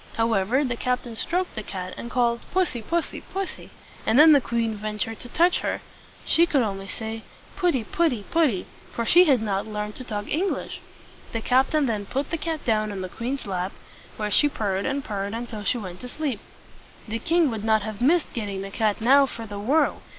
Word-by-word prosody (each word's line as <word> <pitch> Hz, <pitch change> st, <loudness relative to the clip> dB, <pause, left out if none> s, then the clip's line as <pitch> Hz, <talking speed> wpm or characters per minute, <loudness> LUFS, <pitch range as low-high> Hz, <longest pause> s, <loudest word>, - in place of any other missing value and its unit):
However, 225 Hz, +3 st, +2 dB
the 245 Hz, -2 st, -1 dB
captain 250 Hz, -1 st, -2 dB
stroked 360 Hz, +10 st, -1 dB
the 215 Hz, -, -4 dB
cat, 185 Hz, -3 st, -6 dB
and 235 Hz, -, -7 dB
called, 235 Hz, -1 st, +2 dB
"Pussy, 355 Hz, -10 st, +1 dB
pussy, 340 Hz, +9 st, -2 dB
pussy!" 390 Hz, -1 st, -5 dB, 0.3 s
and 220 Hz, -, +2 dB
then 310 Hz, +2 st, +9 dB
the 285 Hz, -2 st, +7 dB
queen 230 Hz, -2 st, -1 dB
ventured 215 Hz, +1 st, -4 dB
to 245 Hz, -, -9 dB
touch 345 Hz, +7 st, +3 dB
her. -, -, -2 dB, 0.5 s
She 335 Hz, +1 st, +4 dB
could 275 Hz, -6 st, +3 dB
only 195 Hz, -2 st, -3 dB
say, 220 Hz, +2 st, -5 dB, 0.3 s
"Putty, 345 Hz, -, +1 dB
putty, 245 Hz, -4 st, 0 dB
putty!" 300 Hz, -, +2 dB, 0.3 s
for 235 Hz, -, -2 dB
she 355 Hz, +9 st, +7 dB
had 265 Hz, -8 st, +3 dB
not 200 Hz, -1 st, -1 dB
learned 210 Hz, 0 st, -4 dB
to 255 Hz, -, -7 dB
talk 210 Hz, -4 st, -4 dB
English. 365 Hz, +6 st, -2 dB, 0.5 s
The 225 Hz, -, -1 dB
captain 265 Hz, +5 st, +3 dB
then 210 Hz, -5 st, -2 dB
put 275 Hz, +2 st, -2 dB
the 330 Hz, -, -1 dB
cat 320 Hz, -1 st, -3 dB
down 215 Hz, -2 st, +1 dB
on 195 Hz, -2 st, -4 dB
the 185 Hz, -, -4 dB
queen's 255 Hz, +8 st, -4 dB
lap, 185 Hz, -1 st, -2 dB, 0.4 s
where 210 Hz, -1 st, -2 dB
she 295 Hz, -, +5 dB
purred 200 Hz, -6 st, -1 dB
and 275 Hz, 0 st, -1 dB
purred 200 Hz, -1 st, -3 dB
until 230 Hz, -3 st, -5 dB
she 210 Hz, -, +1 dB
went 185 Hz, -5 st, -7 dB
to 250 Hz, -, -7 dB
sleep. 275 Hz, -4 st, -3 dB, 0.7 s
The 225 Hz, +1 st, -3 dB
king 325 Hz, +2 st, +2 dB
would 220 Hz, -2 st, -4 dB
not 220 Hz, -1 st, +3 dB
have 215 Hz, 0 st, -6 dB
missed 320 Hz, +6 st, +3 dB
getting 200 Hz, -4 st, -3 dB
the 195 Hz, -, -7 dB
cat 215 Hz, 0 st, 0 dB
now 275 Hz, +4 st, +6 dB
for 230 Hz, -3 st, -7 dB
the 205 Hz, -1 st, -6 dB
world. 275 Hz, +10 st, +2 dB
230 Hz, 200 wpm, -25 LUFS, 210-280 Hz, 0.7 s, then